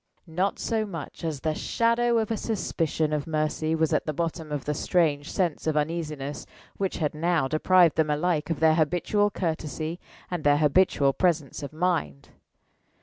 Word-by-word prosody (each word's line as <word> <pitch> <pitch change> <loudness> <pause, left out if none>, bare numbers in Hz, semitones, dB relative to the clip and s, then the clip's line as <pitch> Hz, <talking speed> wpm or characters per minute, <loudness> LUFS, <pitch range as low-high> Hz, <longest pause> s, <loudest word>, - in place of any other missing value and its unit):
Not 180 +4 -1
so 225 -1 -1
much 170 -6 -7
as 155 -4 -3
the 155 - 0
shadow 235 +5 +1
of 220 -1 0
a - - +1
suspicion 165 -8 -1
of 150 0 -2
Mercy 155 0 0
was 160 -1 +1
at - - 0
the 155 - -1
bottom 165 -1 -3
of 145 -2 -3
the 150 - 0
strange 150 -2 0
sense 175 -5 -1
of 155 -1 +1
uneasiness 150 -2 -3 0.3
which 195 -1 -2
had 150 -3 -1
now 160 -2 +1
deprived 170 +3 +4
them 155 -1 +2
alike 155 +1 0
of 165 - -1
their 160 -1 +6
habitual 180 +6 +1
courtesy 160 -2 -3 0.3
and 175 -4 -3
their 145 0 +4
habitual 150 -2 +3
presence 160 -5 0
of 140 - -6
mind. 155 - -1
160 Hz, 170 wpm, -26 LUFS, 150-180 Hz, 0.3 s, their